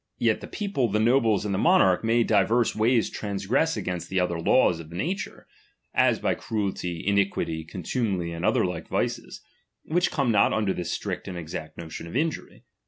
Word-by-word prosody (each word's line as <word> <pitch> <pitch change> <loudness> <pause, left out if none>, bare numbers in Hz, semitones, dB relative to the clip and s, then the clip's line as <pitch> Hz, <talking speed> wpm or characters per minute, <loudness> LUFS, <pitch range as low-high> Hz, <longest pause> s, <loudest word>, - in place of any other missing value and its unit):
Yet - - +1
tlie - - -9
people, 200 - -1
the 105 0 0
nobles, 115 -3 +3
and 100 - -1
the 95 - 0
monarch 165 - +4
may 115 +1 +3
di 105 -4 +3
"Verse 115 +4 +1
ways 115 +2 +3
transgress 105 +10 -1
against 90 -2 -4
the 95 - 0
other 85 -2 0
laws 85 -1 +3
of 80 - -9
*^»ature, 165 - -4 0.5
as - - +3
by - - 0
cruelty, 95 -6 -3
iniquity, 100 -5 0
contumely, 90 +1 -2
and 85 +1 -6
Either - - +3
like 90 -3 -4
vices, - - -3 0.4
which 175 +3 +1
come 140 -8 0
not 100 -2 +4
under 105 -3 +1
this 90 - -4
strict - - -4
^Jid 95 - -5
exact 80 -2 -7
notion 85 0 -7
of 85 - -9
injury. 155 +3 -2
100 Hz, 180 wpm, -26 LUFS, 90-120 Hz, 0.5 s, monarch